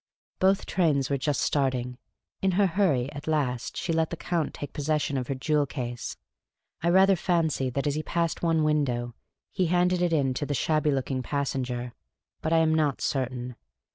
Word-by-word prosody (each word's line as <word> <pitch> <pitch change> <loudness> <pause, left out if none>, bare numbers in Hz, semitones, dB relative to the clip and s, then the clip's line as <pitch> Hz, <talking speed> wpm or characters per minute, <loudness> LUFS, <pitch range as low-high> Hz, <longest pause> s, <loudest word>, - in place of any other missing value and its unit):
Both 190 +1 +3
trains 145 -7 +1
were 140 - +2
just 145 +1 0
starting. 125 -3 0 0.4
In 190 -1 +2
her 200 +2 +4
hurry, 165 -9 +1
at 145 +1 -9
last, 135 -6 -1
she 165 - -1
let 160 -1 +1
the 170 - -5
Count 170 -2 -1
take 145 - -7
possession 150 -1 0
of 125 -2 -2
her 135 - -2
jewel 145 +2 +1
case. 120 -3 -5 0.6
I 170 - +2
rather 190 +2 +6
fancy 165 -7 0
that 140 +3 -2
as 145 - +1
he 155 - -1
passed 170 0 -1
one 165 -2 +2
window 130 -6 0 0.4
he 185 -3 0
handed 180 +1 +2
it 175 -1 +2
in 140 -5 +2
to 145 - -2
the 145 - -1
shabby 155 +4 +1
looking 135 -1 -1
passenger; 125 -3 -2 0.5
but 155 - -2
I 165 - +5
am 160 -1 +3
not 150 -4 +1
certain. 125 -2 -2
150 Hz, 185 wpm, -27 LUFS, 130-165 Hz, 0.6 s, rather